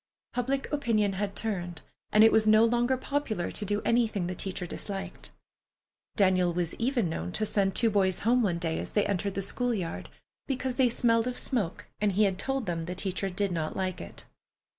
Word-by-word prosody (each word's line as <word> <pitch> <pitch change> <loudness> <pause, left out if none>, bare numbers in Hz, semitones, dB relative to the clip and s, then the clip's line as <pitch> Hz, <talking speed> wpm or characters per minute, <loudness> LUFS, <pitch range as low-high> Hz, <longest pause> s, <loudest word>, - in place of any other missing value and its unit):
Public 265 +2 -1
opinion 220 -8 +1
had 200 +1 -3
turned, 180 -7 -3 0.3
and 215 +1 +6
it 225 - +7
was 220 -1 +3
no 215 +1 +6
longer 240 +2 +2
popular 255 -9 -2
to 210 - -1
do 205 +1 -1
anything 225 -6 +1
the 180 - -3
teacher 185 0 -4
disliked. 195 +1 -6 0.9
Daniel 185 -4 +3
was 170 -1 -2
even 240 -4 +1
known 90 - -4
to 215 - -1
send 200 -2 +1
two 230 -2 +4
boys 190 -3 +1
home 245 +3 +3
one 185 -6 +1
day 165 -2 -2
as - - -6
they 205 - +2
entered 200 0 -1
the 195 - -1
school 245 +4 -1
yard, 175 -5 -4 0.4
because 260 -2 -2
they 260 -2 +4
smelled 230 0 +2
of 250 - -3
smoke 205 -10 0
and 205 -2 +1
he 210 +3 +3
had 195 -2 +1
told 270 -2 -2
them 165 -2 -2
the 180 +2 -5
teacher 190 +1 -2
did 195 +1 -1
not 160 -3 -2
like 185 -1 -2
it. 85 - -10
205 Hz, 200 wpm, -28 LUFS, 185-235 Hz, 0.9 s, it